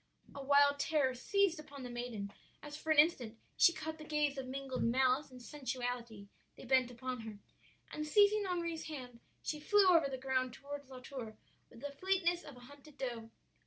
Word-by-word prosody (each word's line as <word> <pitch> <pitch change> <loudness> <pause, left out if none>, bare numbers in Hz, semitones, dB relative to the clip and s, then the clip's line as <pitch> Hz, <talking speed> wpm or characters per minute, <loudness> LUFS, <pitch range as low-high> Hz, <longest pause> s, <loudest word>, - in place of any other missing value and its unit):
"A 280 - -7
wild 285 +1 +5
terror 285 -4 +2
seized 370 +6 +1
upon 285 -3 -10
the 250 - -6
maiden 235 -5 -5 0.3
as 295 0 -7
for 310 +1 -8
an 310 - +3
instant 255 -8 +4 0.2
she - - +7
caught 315 -1 -6
the - - -8
gaze 300 -2 0
of 265 -2 -5
mingled 265 -1 -4
malice 260 +4 +2
and 255 -1 -12
sensuality 245 -5 -5 0.3
they - - -10
bent 255 -1 +3
upon 250 +1 -5
her; 220 -2 -8 0.5
and 305 0 -4
seizing 410 +4 +5
Henri's 335 -3 -2
hand, 250 -6 -7 0.2
she 305 - -3
flew 410 +6 +4
over 330 -5 +5
the 265 - -4
ground 255 -1 -1
toward 285 0 -8
La 255 -1 -9
Tour 240 -5 -7 0.3
with 230 - -15
the 285 - -4
fleetness 350 +2 0
of 285 -4 -11
a - - -13
hunted 285 +3 -15
doe. 240 -4 -4
275 Hz, 190 wpm, -35 LUFS, 250-305 Hz, 0.5 s, she